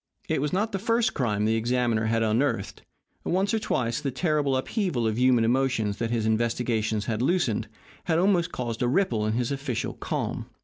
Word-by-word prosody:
It - - 0
was 150 - -1
not 210 +4 0
the 195 - -2
first 230 +3 +1
crime 105 -5 0
the 110 - +2
examiner 115 -1 +1
had 115 0 +1
unearthed. 115 -1 0 0.4
Once 190 +4 0
or 225 - +2
twice 120 - -1
the 140 - -1
terrible 145 -1 +1
upheaval 155 - -1
of 110 +1 0
human 125 -2 +4
emotions 115 -4 +1
that 115 - -2
his 115 -2 0
investigations 110 -1 0
had 115 -1 -2
loosed 135 - +1 0.4
had 160 -2 +1
almost 180 -1 +2
caused 120 -2 -4
a 125 - +2
ripple 120 - +1
in 110 - 0
his 120 +2 -1
official 135 -4 -3
calm. - - -3
125 Hz, 185 wpm, -26 LUFS, 115-155 Hz, 0.4 s, human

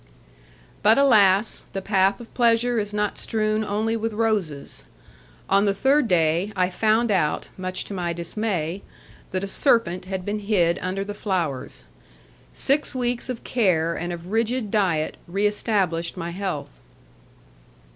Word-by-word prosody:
But, 215 +2 +5
alas! 215 -6 +4
the 195 - -2
path 195 -1 +2
of 235 - -12
pleasure 235 0 +2
is 205 -1 -3
not 210 -1 -1
strewn 215 -1 0
only 215 +2 -1
with 225 0 -2
roses! 210 -10 -2 0.6
On 195 +1 +3
the 200 -1 +1
third 270 +4 +3
day, 170 +2 +2
I 185 -1 +1
found 220 +4 +2
out, 170 -6 0
much 185 0 -4
to - - -7
my 175 -3 -2
dismay, 170 0 -3 0.5
that 185 +1 -2
a - - -2
serpent 195 -6 +2
had 190 -1 -4
been 210 +1 -2
hid 190 -5 +1
under 190 +2 -2
the 205 - -5
flowers. 170 -11 -3 0.7
Six 280 0 0
weeks 245 0 -2
of 250 -2 -5
care 175 -9 +1
and 175 +1 -4
of 175 +2 -7
rigid 225 0 0
diet 175 -7 +1
re 195 +4 -1
established 190 -6 0
my 170 -1 -4
health. 170 - -5
200 Hz, 145 wpm, -24 LUFS, 180-220 Hz, 0.7 s, But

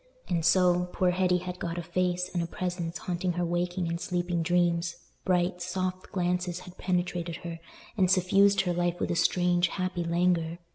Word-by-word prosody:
And 170 -2 0
so, 180 +1 +3
poor 180 -1 +2
Hetty 180 0 +2
had 180 0 -6
got 170 0 -3
a 175 - -3
face 180 +1 0
and 175 - 0
a 170 - -2
presence 175 -1 -3
haunting 180 -3 -2
her 175 0 -1
waking 175 +1 -1
and 170 +1 -3
sleeping 175 -1 -1
dreams; 170 0 +1 0.3
bright, 180 0 +1
soft 185 0 -3
glances 180 -1 -1
had 180 0 -13
penetrated 175 -2 -1
her, 165 -1 -5 0.4
and 185 -3 +3
suffused 195 +2 +4
her 180 -2 -1
life 175 0 0
with - - -1
a - - 0
strange, 175 +1 +3
happy 185 -1 -2
languor. 170 -1 +1
180 Hz, 180 wpm, -28 LUFS, 175-180 Hz, 0.4 s, suffused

